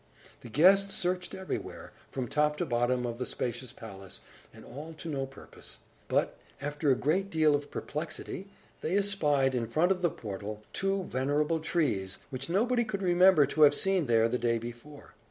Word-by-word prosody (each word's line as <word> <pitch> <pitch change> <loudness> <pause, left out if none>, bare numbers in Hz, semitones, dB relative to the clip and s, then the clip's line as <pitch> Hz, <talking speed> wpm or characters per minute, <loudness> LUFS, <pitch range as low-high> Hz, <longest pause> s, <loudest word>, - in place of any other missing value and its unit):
The 120 - -11
guests 195 - +5
searched 180 0 -1
everywhere, 190 0 -6 0.2
from 130 -2 -3
top 150 +2 +1
to 175 - -1
bottom 125 -1 +1
of 120 0 -4
the 125 - -2
spacious 125 0 -4
palace, 100 -4 -10 0.3
and - - -14
all 155 +4 -9
to 170 - -8
no 135 -4 -2
purpose. 135 - -11 0.3
But, - - 0 0.2
after 145 +1 -1
a 130 - +5
great 180 +10 0
deal 155 -4 +3
of 145 0 -1
perplexity, 165 +5 -5 0.3
they 175 +5 0
espied, 150 -10 +2
in 120 -2 -1
front 160 +10 +2
of 185 -1 0
the 175 - +3
portal, 105 -3 -7
two 195 0 0
venerable 150 +3 0
trees, 145 - -1
which 135 +3 -4
nobody 240 +7 +2
could 205 -3 -4
remember 180 -3 +6
to 150 +3 -2
have 145 -1 +8
seen 190 -6 +1
there 115 -1 +4
the 125 +2 -1
day 115 -1 +1
before. 120 +6 -10
150 Hz, 175 wpm, -30 LUFS, 125-180 Hz, 0.3 s, have